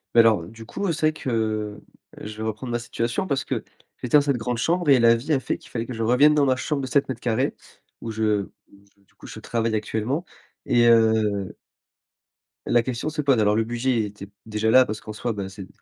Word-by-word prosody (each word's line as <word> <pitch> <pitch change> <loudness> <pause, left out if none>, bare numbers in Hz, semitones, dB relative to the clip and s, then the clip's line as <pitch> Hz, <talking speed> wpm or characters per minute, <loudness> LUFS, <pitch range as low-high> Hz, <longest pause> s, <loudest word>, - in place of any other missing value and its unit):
Beh 115 - +9
alors 110 -6 +3
du 115 +2 -12
coup, 190 - -2
c'est 155 - +1
vrai 155 - +1
que 110 -6 -2 0.4
je 105 0 -7
vais 110 - -5
reprendre 110 +3 -5
ma 120 - -1
situation 120 +8 -2
parce 140 -4 0
que, - - -3 0.4
j'étais 125 +3 0
dans - - +5
cette 140 -2 0
grande 120 +1 -2
chambre 170 +4 0
et 135 -2 +7
la 115 0 +6
vie 135 +7 -2
a 140 - +2
fait - - -3
qu'il - - -18
fallait 115 -1 -3
que 130 - -5
je 115 -1 -3
revienne 135 +7 +5
dans 145 -1 +3
ma 130 -1 +3
chambre 140 +3 -2
de - - -3
7m2 130 -3 0 0.5
où 115 - -5
je 110 -2 0 0.3
où 100 0 -21
je 100 - -32
du - - -33
coup - - -15
je - - -9
travaille 115 -1 -2
actuellement 110 +8 -2 0.4
et 120 -1 +4
heu 110 -4 +3 1.1
La 120 -1 +3
question 125 +4 -3
se 155 0 -3
pose. 135 -5 +3
Alors 105 -1 +3
le 115 - +2
budget 120 0 0
était 100 -1 -9 0.2
déjà 110 0 -1
là, 130 +2 +7
parce 105 -2 -5
qu'en 110 - -8
soi 115 +2 -3
bah, 100 -2 -4
c'est 95 -1 -10
115 Hz, 230 wpm, -24 LUFS, 110-130 Hz, 1.1 s, Beh